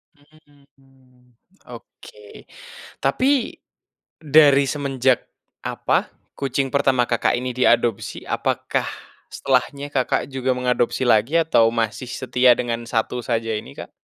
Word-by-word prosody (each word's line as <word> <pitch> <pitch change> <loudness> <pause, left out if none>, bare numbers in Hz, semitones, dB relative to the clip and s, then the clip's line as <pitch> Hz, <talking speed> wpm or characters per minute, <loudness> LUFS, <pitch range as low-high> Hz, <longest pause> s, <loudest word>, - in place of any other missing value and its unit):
Mmm, 135 -4 -27 0.4
oke, 105 -3 -14 0.6
tapi 255 - +1 0.6
dari 145 -2 +5
semenjak 135 -3 0 0.4
apa, - - 0 0.3
kucing 135 0 -1
pertama 135 -2 +2
Kakak 115 - +1
ini 125 +1 -3
diadopsi, 120 -4 +1
apakah - - -1 0.5
setelahnya 140 +2 -1
Kakak 130 0 -1
juga 130 -1 -1
mengadopsi 125 -1 0
lagi 120 +4 +2
atau 155 -8 +3
masih 115 +1 -2
setia 125 -1 +3
dengan 120 -1 -3
1 115 +1 -2
saja 115 -1 -1
ini, - - -9
Kak? - - -9
130 Hz, 105 wpm, -21 LUFS, 120-140 Hz, 0.6 s, dari